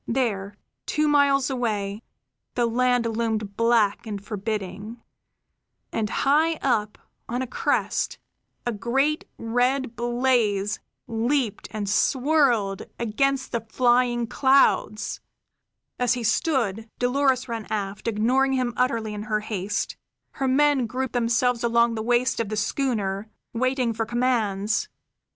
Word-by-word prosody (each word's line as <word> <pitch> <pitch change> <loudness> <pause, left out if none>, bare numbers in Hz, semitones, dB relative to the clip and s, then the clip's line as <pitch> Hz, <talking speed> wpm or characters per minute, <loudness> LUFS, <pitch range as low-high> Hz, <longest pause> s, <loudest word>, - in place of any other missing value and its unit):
There, 210 -5 -1 0.3
two 305 0 +1
miles 280 -2 +3
away, 210 -5 -2 0.5
the 240 - +2
land 245 +1 +2
loomed 220 -3 -2
black 230 -2 +2
and 205 -2 -4
forbidding; 210 +1 -5 0.9
and 215 -2 -1
high 310 +7 +2
up, 220 -8 0 0.3
on 245 +2 -1
a - - -2
crest, 255 - -1 0.5
a 240 - 0
great 270 +8 0
red 245 +2 0
blaze 235 -4 +1 0.3
leaped 235 0 -1
and 210 -2 -4
swirled 245 -3 +2 0.2
against 270 +4 0
the 235 - -1
flying 240 +1 +2
clouds. 250 -4 +2 0.8
As 245 -1 +3
he 245 - -4
stood, 225 -3 0
Dolores 255 0 +1
ran 230 -3 -5
aft, 200 0 -3
ignoring 250 +5 +2
him 250 -2 0
utterly 230 -4 0
in 210 - -5
her 215 0 +1
haste. 205 -1 -3 0.3
Her 270 - -2
men 275 -1 +3
grouped 255 +2 -3
themselves 240 0 +1
along 235 0 +3
the 220 - -3
waist 240 +2 +1
of 225 -3 -1
the 215 - -3
schooner, 210 -4 -1 0.2
waiting 255 0 0
for 225 0 -2
commands. 225 - 0
235 Hz, 125 wpm, -25 LUFS, 215-255 Hz, 0.9 s, miles